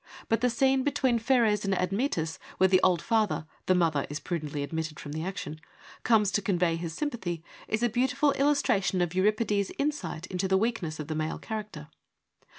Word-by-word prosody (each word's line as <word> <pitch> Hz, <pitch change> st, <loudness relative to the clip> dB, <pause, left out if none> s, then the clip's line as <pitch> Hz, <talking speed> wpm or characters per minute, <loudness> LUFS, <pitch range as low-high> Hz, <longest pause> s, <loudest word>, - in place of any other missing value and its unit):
But 225 Hz, 0 st, +2 dB
the 250 Hz, -, +3 dB
scene 265 Hz, +3 st, +2 dB
between 260 Hz, -3 st, +1 dB
Pheres 225 Hz, -4 st, +2 dB
and 195 Hz, -1 st, +1 dB
Admetus 180 Hz, -, -1 dB, 0.2 s
where 190 Hz, -, +5 dB
the 185 Hz, 0 st, +4 dB
old 180 Hz, -3 st, +3 dB
father 220 Hz, -8 st, +1 dB
— -, -, -35 dB
the 185 Hz, -, +4 dB
mother 160 Hz, -5 st, +1 dB
is 145 Hz, +1 st, -4 dB
prudently 150 Hz, -5 st, -3 dB
omitted 160 Hz, +1 st, -4 dB
from 145 Hz, -, -7 dB
the 155 Hz, +2 st, -3 dB
action, 155 Hz, -4 st, -5 dB, 0.2 s
— -, -, -19 dB
comes 215 Hz, -4 st, +4 dB
to 205 Hz, -, +1 dB
convey 180 Hz, -6 st, +1 dB
his 165 Hz, -1 st, -5 dB
sympathy, 185 Hz, -, -3 dB, 0.2 s
is 220 Hz, +2 st, -1 dB
a -, -, +5 dB
beautiful 260 Hz, +5 st, +2 dB
illustration 275 Hz, -10 st, +2 dB
of 175 Hz, -1 st, 0 dB
Euripides' 205 Hz, +1 st, +1 dB
insight 235 Hz, -, -2 dB
into 185 Hz, 0 st, -2 dB
the 190 Hz, 0 st, +3 dB
weakness 190 Hz, -8 st, -1 dB
of 150 Hz, -, -4 dB
the 155 Hz, -, -2 dB
male 155 Hz, +1 st, -2 dB
character. 210 Hz, -9 st, -6 dB
190 Hz, 190 wpm, -28 LUFS, 165-230 Hz, 0.2 s, where